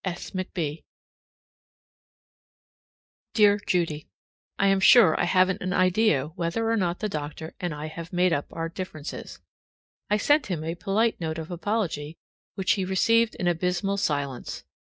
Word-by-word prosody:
S. 175 -2 -5
McB. 170 -5 -4 2.5
Dear 205 -1 +5
Judy: 165 -4 0 0.5
I 195 - +2
am 195 0 +4
sure 215 -4 +7
I - - +2
haven't 185 +1 +2
an 185 0 -2
idea 185 -6 +2
whether 175 +7 -2
or - - +2
not 180 -4 -1
the 215 - 0
doctor 155 -2 -6
and 175 -2 -2
I 150 0 -5
have 165 +2 -8
made 180 -1 +2
up 145 - -1
our 165 0 -3
differences. 165 -3 -7 0.7
I 210 - +3
sent 290 +6 +2
him 170 -5 -3
a 165 +1 -2
polite 200 +5 0
note 160 -1 -3
of 160 +1 -6
apology, 175 -5 -2 0.4
which 190 +1 +1
he 195 - +1
received 225 +5 +2
in 180 - -2
abysmal 180 +3 0
silence. 145 -8 -2
180 Hz, 150 wpm, -26 LUFS, 160-200 Hz, 2.5 s, sure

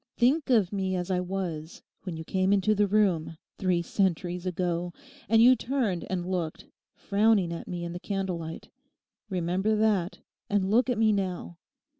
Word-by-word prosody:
Think 270 +5 +2
of 215 -7 +3
me 190 -1 -1
as 180 +1 -2
I 180 - +1
was 180 -4 -4 0.2
when 180 -4 -6
you 160 - -6
came 185 +3 0
into 205 +1 +3
the 205 0 +2
room, 185 -6 +1 0.2
three 180 -3 +1
centuries 180 -1 -1
ago, 175 -1 -2 0.4
and 225 +1 +6
you 255 +2 +8
turned 235 -10 -1
and 180 -2 -2
looked, 175 -4 -3 0.3
frowning 200 -4 +2
at 165 - -7
me 175 -1 -4
in 170 0 -5
the 175 - -5
candle 190 -3 -3
light; 160 0 -8 0.6
remember 185 +3 0
that 210 -4 +1 0.3
and 200 -1 +1
look 245 +4 +3
at 245 - +1
me 220 -1 +4
now. 185 -4 -3
190 Hz, 170 wpm, -28 LUFS, 175-210 Hz, 0.6 s, you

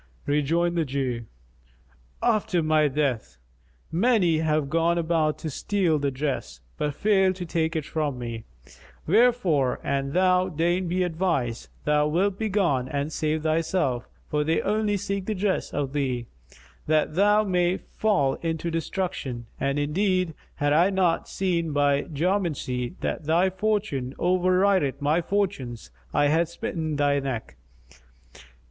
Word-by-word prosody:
Rejoined 165 +4 +1
the 165 - +2
Jew, 130 -4 -2 1.0
"After 215 -6 +2
thy 155 -1 +3
death! 130 - -1 0.5
Many 180 -4 +3
have 155 -2 +1
gone 165 +3 +1
about 160 -2 +1
to 155 - -5
steal 175 -1 0
the 140 0 0
dress, 130 - -3 0.2
but 145 -1 -2
failed 190 -2 +3
to 180 -1 -5
take 165 0 -1
it 155 -2 -1
from 150 -4 -2
me; 115 -2 -5 0.6
wherefore 190 - +3
an 140 0 -1
thou 185 0 +3
deign 175 +3 0
be 180 +2 0
advised, 165 -9 -1 0.2
thou 150 0 +3
wilt 190 +5 0
begone 185 - +1
and 145 +3 -2
save 155 0 -1
thyself; 155 -5 0 0.2
for 150 0 0
they 160 +2 +1
only 210 0 +1
seek 200 -1 -3
the 215 - -1
dress 190 0 -1
of 140 -1 -2
thee, 130 -4 -1 0.6
that 155 0 +2
thou 205 +4 +4
mayst 180 -2 0
fall 190 -11 +1
into 165 0 -2
destruction; 160 -7 -3
and 140 +1 0
indeed, 180 +3 +1 0.2
had 145 0 +1
I 170 +5 +5
not 185 -4 +1
seen 170 -5 -1
by 145 0 +2
geomancy 155 -6 -1
that 160 - -3
thy 170 +5 +3
fortune 190 -10 -1
overrideth 185 -5 +2
my 150 +4 +2
fortunes 165 - -2 0.2
I 145 0 +3
had 165 +3 +2
smitten 160 -2 -3
thy 145 -1 +2
neck." 120 - -4
160 Hz, 140 wpm, -25 LUFS, 145-185 Hz, 1.0 s, I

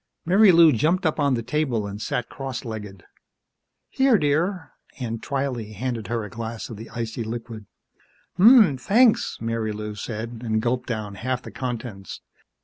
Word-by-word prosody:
Marilou 175 -3 +6
jumped 165 - +1
up 160 0 0
on 140 -3 +2
the 115 - -3
table 130 -7 -1
and 100 +1 -6
sat 125 +1 -2
cross 135 -2 -6
legged. 105 -5 -7 0.8
"Here, 265 -4 +3
dear." 160 +3 0 0.3
Aunt 115 -3 -4
Twylee 130 -6 -3
handed 115 -1 -3
her 115 0 -2
a 105 - -7
glass 115 -1 -6
of 110 - -7
the 115 +2 -9
icy 115 0 -4
liquid. 115 -2 -7 0.7
"Ummm, 210 - +7
thanks," 225 - +3
Marilou 110 -2 -3
said, 115 +2 -6
and 110 -2 0
gulped 125 +2 -1
down 110 -4 -4
half 125 +5 -3
the - - -9
contents. 120 -6 -6
120 Hz, 150 wpm, -24 LUFS, 110-145 Hz, 0.8 s, Ummm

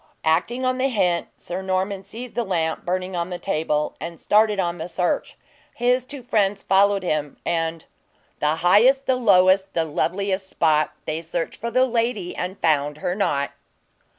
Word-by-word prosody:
Acting 240 +11 +1
on 255 0 0
the 265 - +2
hint, 180 -7 +1
Sir 180 +2 -5
Norman 190 +1 -1
seized 235 +4 -8
the 240 - -1
lamp 165 -6 -1
burning 185 +1 -2
on 170 0 -2
the 180 - -4
table, 155 -5 -1
and 170 0 -6
started 210 -1 +3
on 175 -2 -1
the 165 +2 -5
search. 175 +1 -1 0.4
His 250 +1 +1
two 280 -3 -7
friends 205 -4 +1
followed 195 0 +3
him, 150 -4 -2
and 165 -1 -1 0.5
"The 150 +1 +1
highest, 255 +9 +5
the 260 - +2
lowest, 190 -4 +4
the 165 -1 +1
loveliest 190 +4 -1
spot, 155 -2 +2
They 155 +1 -3
searched 165 0 -4
for 235 - -2
the 255 +2 +3
lady, 230 -6 -1
and 180 +2 -4
found 150 -2 +1
her 175 - -2
not." 145 -8 0
185 Hz, 170 wpm, -23 LUFS, 165-215 Hz, 0.5 s, highest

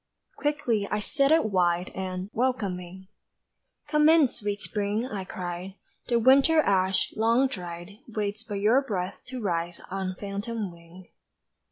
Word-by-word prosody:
Quickly 235 -8 0
I - - 0
set 275 +6 +1
it 320 -4 +5
wide 180 -3 +1
And, 185 +1 -4
welcoming, 190 -7 -2 0.8
"Come 300 0 +4
in, 320 -2 +7
sweet 205 -4 -3
Spring," 210 +2 -2
I 205 -6 -4
cried, 180 +1 -6 0.3
"The 240 - +2
winter 270 +7 +5
ash, 190 -7 +2
long 230 +4 +3
dried, 175 -2 -8
Waits 215 -1 -3
but 210 - -5
your 215 +7 +4
breath 190 -8 -3
to 255 0 -6
rise 170 -4 -2
On 190 -1 -3
phantom 205 +1 -4
wing." 170 +2 -15
205 Hz, 140 wpm, -27 LUFS, 185-240 Hz, 0.8 s, in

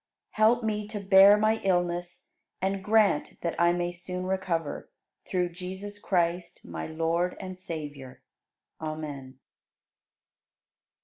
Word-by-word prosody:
Help 225 +2 +3
me 210 -1 -1
to 210 -1 -5
bear 195 +1 +7
my 215 +1 +2
illness 175 -2 -1 0.3
and 190 +1 -1
grant 210 -6 +2
that 170 - -1
I 170 0 +5
may 175 0 -1
soon 180 +1 -5
recover, 185 -5 -2 0.4
through 180 -1 0
Jesus 190 +4 -7
Christ, 175 -2 -1
my 80 -2 -5
Lord 165 +3 -1
and 185 -1 -6
Savior. 150 -7 -8 0.6
Amen. 150 -4 -6
180 Hz, 115 wpm, -28 LUFS, 165-195 Hz, 0.6 s, bear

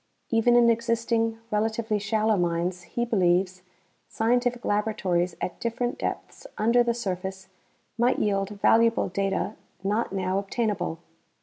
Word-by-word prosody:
Even 230 +1 +4
in 240 -1 +6
existing, 230 0 +1
relatively 220 0 0
shallow 215 +1 +1
mines, 175 0 -1
he 235 +7 -3
believes, 185 -4 +1 0.5
scientific 245 +1 0
laboratories 195 -5 0
at 180 - -4
different 240 +1 -2
depths - - -5
under 235 +3 +4
the 235 -1 +1
surface 190 -3 -4 0.5
might 245 +2 +3
yield 195 -1 0
valuable 230 +2 +3
data 195 +2 -1 0.3
not 210 +4 0
now 190 0 0
obtainable. 205 -4 -2
215 Hz, 120 wpm, -26 LUFS, 190-230 Hz, 0.5 s, in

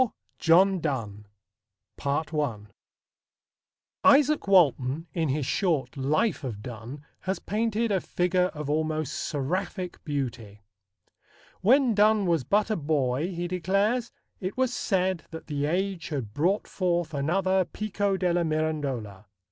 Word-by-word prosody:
IV. 255 - +4 0.3
JOHN 185 +3 +5
DONNE 110 -10 -3 2.8
Izaak 285 -2 +5
Walton 155 -5 +3
in 165 -3 0
his 140 +1 0
short 155 -7 0
life 155 - 0
of 110 -6 -5
Donne 125 +5 -8
has 190 +1 -2
painted 225 +1 -1
a 190 -3 +1
figure 180 0 +1
of 150 -1 -5
almost 155 0 -1
seraphic 175 +5 -3
beauty. 120 -8 -4 1.0
When 250 +4 +4
Donne 210 0 +4
was 165 -6 +1
but 210 - +1
a - - +2
boy, 145 -2 0
he 175 0 -3
declares, 195 +7 0 0.3
it 185 +4 -4
was 260 -1 +1
said 185 -6 0
that 160 - -8
the 145 -1 -2
age 185 +1 -1
had 125 -9 -4
brought 180 - +1
forth 175 -3 -1
another 185 +6 +1
Pico 200 0 -2
della 175 -2 +1
Mirandola. 145 - -2
170 Hz, 125 wpm, -27 LUFS, 145-195 Hz, 2.8 s, JOHN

